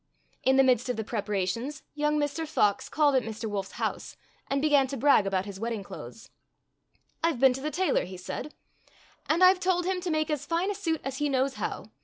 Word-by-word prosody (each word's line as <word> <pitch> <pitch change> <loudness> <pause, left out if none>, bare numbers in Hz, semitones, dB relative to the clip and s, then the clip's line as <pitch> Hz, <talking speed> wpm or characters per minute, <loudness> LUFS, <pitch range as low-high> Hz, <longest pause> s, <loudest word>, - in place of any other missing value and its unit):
In 265 - +3
the 270 - +7
midst 250 -1 +2
of 250 - 0
the 220 - -2
preparations 210 +5 -3
young 300 0 +1
Mr. 295 +2 -1
Fox 210 -10 +1
called 295 -1 +3
at 260 - +4
Mr. 225 0 -6
Wolf's 200 -2 -4
house - - -4 0.3
and 275 - 0
be 305 - +2
gan 280 -2 +4
to 275 +1 -5
brag 255 -6 +4
about 190 -1 0
his 200 -2 -8
wedding 225 -2 -3
clothes. - - -10 0.4
" - - -42
I 330 - +4
've 250 - -8
been 265 -1 +6
to 265 - -6
the 300 - -2
tailor," 365 +4 +1
he 185 0 -8
said, 190 +11 -6 0.7
"and 335 +4 +3
I've 365 0 +7
told 365 -1 +1
him 370 0 -1
to 360 - -3
make 310 -1 0
as 300 -3 -1
fine 345 +4 0
a - - -1
suit 335 -6 -2
as 270 -1 -4
he 295 +1 0
knows 265 0 +1
how. - - -5
275 Hz, 230 wpm, -28 LUFS, 225-310 Hz, 0.7 s, the